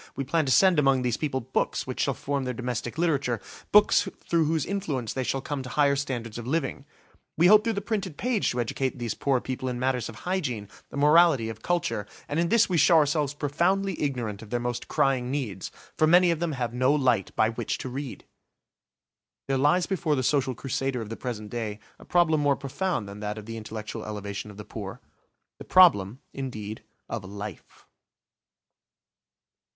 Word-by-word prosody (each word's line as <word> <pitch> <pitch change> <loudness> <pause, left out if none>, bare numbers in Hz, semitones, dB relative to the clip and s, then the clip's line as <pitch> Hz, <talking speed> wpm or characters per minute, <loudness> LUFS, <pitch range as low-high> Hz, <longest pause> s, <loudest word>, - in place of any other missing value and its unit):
We 135 - -2
plan 155 +2 0
to - - +2
send 185 +2 +5
among 135 -3 +3
these 120 -2 +1
people 140 -4 -2
books 130 +3 -1
which - - -6
shall - - +1
form 140 -1 -2
their 125 -1 -3
domestic 120 0 -4
literature–books 165 - +2 0.2
through 165 -2 +3
whose 160 -2 0
influence 150 - -2
they 130 - -2
shall 135 +2 -1
come 145 0 -4
to 130 - -7
higher 140 +2 +3
standards 120 -5 -4
of 120 - -7
living. 140 -1 -2 0.5
We 165 - +4
hope 210 +3 +7
through 230 - 0
the 200 - -2
printed 195 -8 -3
page 245 -4 +1
to 125 - -2
educate 130 +3 -1
these 120 -3 -2
poor 135 -2 +1
people 130 +1 -4
in 125 - -3
matters 125 -2 0
of 115 - -9
hygiene, 130 - -3 0.2
of - - -6
morality, 150 -5 +5
of 110 0 -8
culture, 170 - -1 0.2
and 150 - -1
in 170 0 +1
this 230 +1 +4
we 180 - 0
show 165 +3 +6
ourselves 150 -2 +2
profoundly 180 +7 0
ignorant 120 -8 -2
of 110 - -11
their 120 - -1
most 120 0 -3
crying 130 -2 +1
needs. 125 -9 -3 0.3
For 155 - +3
many 175 +2 +6
of 165 - -1
them 170 -2 -1
have 120 -3 -3
no 130 +2 +3
light 125 -9 +2
by 110 - +3
which 115 -1 -3
to - - -6
read! 130 +1 -6 1.2
There 135 - +1
lies 150 +7 +3
before 175 -6 0
the 130 - -1
social 130 -1 +1
crusader 135 0 -2
of 105 - -10
the 115 - -4
present 110 -5 -5
day 110 -3 -3 0.2
a - - -14
problem 170 -3 +3
more 145 -1 +3
profound 140 - -2
than 100 +1 -9
that 105 0 -4
of 105 - -8
the 115 +1 -6
intellectual 110 -1 -6
elevation 105 -1 -5
of 105 - -12
the 105 - -8
poor; - - -7 0.6
the - - -7
problem, 130 - +5
indeed, 110 -5 -5 0.3
of 115 -4 -4
life. 100 0 -9
135 Hz, 195 wpm, -27 LUFS, 115-160 Hz, 1.2 s, hope